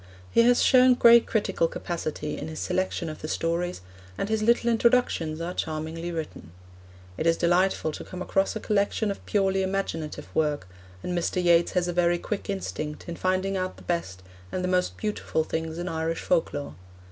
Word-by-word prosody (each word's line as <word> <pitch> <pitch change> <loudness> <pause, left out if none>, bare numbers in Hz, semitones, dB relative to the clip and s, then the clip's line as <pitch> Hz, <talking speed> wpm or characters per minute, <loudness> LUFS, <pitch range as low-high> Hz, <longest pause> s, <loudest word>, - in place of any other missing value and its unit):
He - - +5
has 245 +1 +4
shown 255 -1 +6
great 235 -1 +7
critical 205 -6 +1
capacity 155 -3 -4
in 150 - -6
his 160 0 -7
selection 185 -2 -1
of 155 -1 -7
the 155 - -4
stories, 170 - -1 0.4
and 200 - -2
his 220 0 0
little 235 +2 +3
introductions 230 -9 +2
are 170 +2 -3
charmingly 160 +2 -4
written. 155 - -6 0.7
It 165 - 0
is 165 - +3
delightful 175 -1 +2
to - - -7
come 185 - -8
across 195 +2 0
a - - -2
collection 205 0 0
of 195 - -7
purely 195 -2 +2
imaginative 165 -6 -3
work, 150 -10 0 0.4
and 180 - -2
Mr. 175 +1 0
Yeats 170 -1 +4
has 180 -1 +1
a 175 - -2
very 175 0 +3
quick 205 +4 -5
instinct 155 -6 -4
in 170 - -4
finding 185 +2 0
out 185 0 -3
the - - -14
best 95 - -3 0.3
and 185 - -2
the - - 0
most 180 0 0
beautiful 210 -6 -1
things 160 0 -4
in 175 +1 -4
Irish 165 -1 -2
folklore. 145 - -1
175 Hz, 180 wpm, -26 LUFS, 160-195 Hz, 0.7 s, great